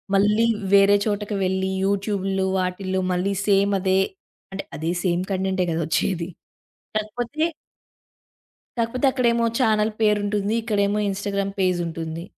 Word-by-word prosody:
మళ్ళీ 210 +3 +4 0.3
వేరే 200 0 +6
చోటకి 210 -1 -2
వెళ్ళి, 190 +1 0
యూట్యూబుల్లో 195 -1 0
వాటిల్లో 185 +1 -1
మళ్ళీ 185 +3 0
సేమ్ 200 0 +3
అదే, 190 0 +2 0.5
అంటే 195 +1 -5
అదే 160 +3 -1
సేమ్ 180 -1 +1
కంటెంటే 190 -1 0
కదా 165 +1 -1
వచ్చేది! 170 +1 0 0.7
కాకపోతే... 240 +7 -3 1.4
కాకపోతే 235 +4 0
అక్కడేమో 235 -3 +2
ఛానెల్ 220 -3 +2
పేరుంటుంది. 205 -1 +1
ఇక్కడేమో 205 -2 +1
ఇన్‌స్టాగ్రామ్ 200 0 -2
పేజ్ 185 -2 +2
ఉంటుంది. 165 0 -5
200 Hz, 115 wpm, -23 LUFS, 185-210 Hz, 1.4 s, వేరే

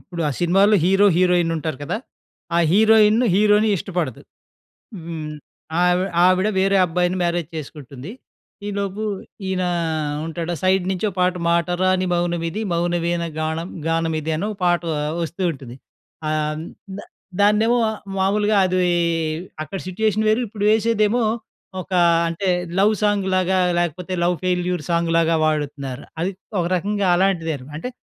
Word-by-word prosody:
ఇప్పుడు 175 -3 -6
ఆ - - -1
సినిమాలో 195 +5 +4
హీరో, 195 +2 +4
హీరోయిన్ 180 -2 +3
ఉంటారు 155 -3 -4
కదా, 175 - -2 0.6
ఆ - - +4
హీరోయిన్ 220 +2 +5
హీరోని 210 +1 +4
ఇష్టపడదు. 170 - -3 0.8
హ్మ్, 155 -2 -5 0.5
ఆవి 180 +1 +3 0.2
ఆవిడ 185 +3 +3
వేరే 195 +1 +3
అబ్బాయిని 180 +2 0
మ్యారేజ్ 170 -2 -1
చేసుకుంటుంది. 140 -1 -8 0.6
ఈలోపు 200 0 -3 0.5
ఈయన 185 -1 -1 0.6
ఉంటాడా, 170 +1 -3
సైడ్ 185 0 +2
నుంచి 190 +2 -2
ఒక 195 - -7
పాట 180 0 +2
'మాట 170 -1 +2 0.2
రాని 185 0 +2
మౌనమిది 175 +2 -1
మౌనవీణ 170 0 0 0.2
గాణం 160 +3 -2 0.2
గానమిది' 160 -1 -1
అనో 200 +6 -2 0.2
పాట 175 -1 +3 0.4
వస్తూ 170 +3 -5
ఉంటుంది. 130 -3 -10 0.5
ఆహ్, 155 0 -1 0.4
ద - - -5 0.4
దాన్నేమో 215 +3 +4 0.4
మామూలుగా 205 +2 +2
అది 185 0 0 0.8
అక్కడ 155 +6 -6
సిట్యుయేషన్ 215 +3 0
వేరు 220 +3 +3
ఇప్పుడు 205 0 -5
వేసేదేమో 220 +1 +2 0.6
ఒక 185 - -10 0.4
అంటే 170 +4 -3 0.3
లవ్ 205 +3 +4
సాంగ్ 205 -2 +1
లాగా 185 0 +2 0.2
లేకపోతే 175 +2 -2
లవ్ 175 0 +2
ఫెయిల్యూర్ 180 -2 0
సాంగ్ 170 0 +1
లాగా 165 0 +3
వాడుతున్నారు. 145 -4 -3 0.2
అది 180 +4 0 0.3
ఒక 175 - +1
రకంగా 200 +1 0
అలాంటిదేన. 165 -8 0
అంటే, 250 - -5
180 Hz, 130 wpm, -21 LUFS, 165-200 Hz, 0.8 s, హీరోయిన్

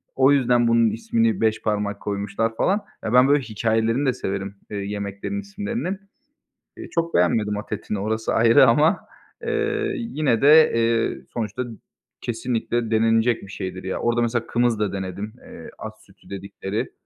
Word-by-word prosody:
o 135 +1 +5
yüzden 125 -3 +3
bunun 115 -1 +4
ismini 115 -2 0
beş 110 -1 +1
parmak 105 -1 -1
koymuşlar 105 +2 -2
falan. 200 - +1 0.2
Ya, 110 - -2
ben 125 +1 +6
böyle 145 0 +4
hikâyelerini 115 +4 0
de 130 - +3
severim, 100 -1 -4 0.2
eee, 105 - -3
yemeklerin 100 - -4
isimlerinin. 205 -1 -4 0.8
Eee, 345 - -8
çok 170 0 -1
beğenmedim 105 +4 +2
at 105 - -8
etini, 105 - -4
orası 110 +2 -1
ayrı 115 +3 +6
ama, 150 +8 +4 0.4
eee, 435 -2 -1
yine 155 - 0
de, 155 +3 +7
eee, 115 0 +1
sonuçta 120 +2 -3 0.6
kesinlikle 120 0 -2
denenecek 115 +1 +2
bir 100 - -10
şeydir, 95 -1 -6
ya. 95 - -3
Orada 120 0 +1
mesela 120 0 -1
kımız 120 -2 +1
da 105 -2 -1
denedim, 100 +3 -5
eee, - - -11
at - - -6
sütü - - -21
dedikleri. 100 +1 -5
115 Hz, 155 wpm, -23 LUFS, 105-135 Hz, 0.8 s, de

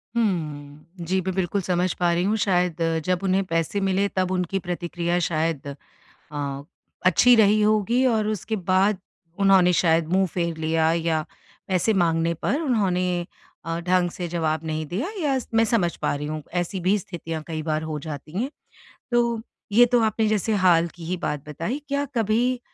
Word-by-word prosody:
हम्म। 165 -4 -3
जी, 190 +3 +1
मैं 190 +1 -3
बिल्कुल 190 +1 0
समझ 180 0 0
पा 175 -1 +3
रही 170 +1 +1
हूँ। 210 +3 +1
शायद 180 -3 +1 0.2
जब 180 -1 +1
उन्हें 195 0 +2
पैसे 165 +3 -1
मिले, 195 +1 +2
तब 185 -2 -1
उनकी 185 +1 -1
प्रतिक्रिया 175 0 -2
शायद 155 -3 -1 0.7
अ, 140 -1 -3 0.4
अच्छी 245 +7 +6
रही 215 -1 +5
होगी 215 +4 +2
और 220 -4 +2
उसके 215 +1 -2
बाद 190 +1 +2 0.4
उन्होंने 190 -2 +5
शायद 165 -2 +2
मुँह 190 +1 +4
फेर 170 -2 -1
लिया 160 0 +1
या 165 -2 0 0.5
पैसे 190 +4 +1
माँगने 165 -2 +2
पर 290 +6 +1
उन्होंने 185 - 0 0.4
अ, 165 0 -2
ढँग 180 0 +1
से 175 -1 -5
जवाब 160 -2 -1
नहीं 155 0 -2
दिया, 205 - -2 0.2
या 275 -3 +2
स - - -10
मैं 225 0 +5
समझ 200 -7 +1
पा - - +1
रही 150 +1 -4
हूँ, 155 0 -4
ऐसी 175 +2 -2
भी 190 +4 +3
स्थितियाँ 165 -3 -6
कई 160 -2 -3
बार 155 0 -1
हो 155 - -3
जाती 150 0 -8
हैं। 265 - -2 0.6
तो 235 -2 +1 0.3
ये 240 +3 +7
तो 245 0 +3
आपने 220 0 +1
जैसे 215 +1 0
हाल 170 -2 +5
की 175 - -10
ही 185 - -1
बात 150 -4 -4
बताई। 165 - -3
क्या 280 0 0
कभी 235 +3 +1
180 Hz, 175 wpm, -24 LUFS, 165-210 Hz, 0.7 s, ये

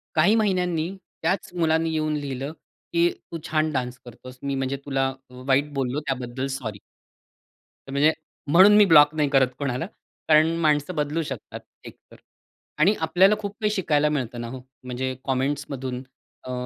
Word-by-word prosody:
काही 210 +5 +5
महिन्यांनी 180 -6 +1 0.3
त्याच 190 -1 -1
मुलाने 165 -1 +1
येऊन 155 -1 -1
लिहिलं, 140 -1 -4 0.4
की 170 0 +4 0.2
तू 165 - -4
छान 155 0 +1
डान्स 125 -1 -2
करतोस. 125 +2 -12
मी 140 -1 -1
म्हणजे 135 +1 -2
तुला 135 -1 0 0.2
अ, 125 - -18
वाईट 145 +2 +2
बोललो 135 +1 -1
त्याबद्दल 130 0 -3
सॉरी. 110 -5 -6 1.1
तर - - -8
म्हणजे 145 +3 +4 0.4
म्हणून 190 +5 +8
मी 210 - +7
ब्लॉक 150 -4 +7
नाही 150 -2 +1
करत 135 -2 +4
कोणाला. 135 +1 -2 0.4
कारण 155 +1 +5
माणसं 155 +2 +1
बदलू 150 +2 -1
शकतात 130 -6 -7 0.3
एकतर - - -14 0.6
आणि 185 +7 +5
आपल्याला 180 +6 +4
खूप 205 -1 -5
काही 210 - +2
शिकायला 150 -7 +1
मिळतं 125 -5 -3
ना 120 - -5
हो, 130 +1 -7 0.2
म्हणजे 130 +1 -3
कॉमेंट्समधून. 135 -1 -2 0.4
अ, 130 - -7
145 Hz, 155 wpm, -24 LUFS, 130-165 Hz, 1.1 s, म्हणून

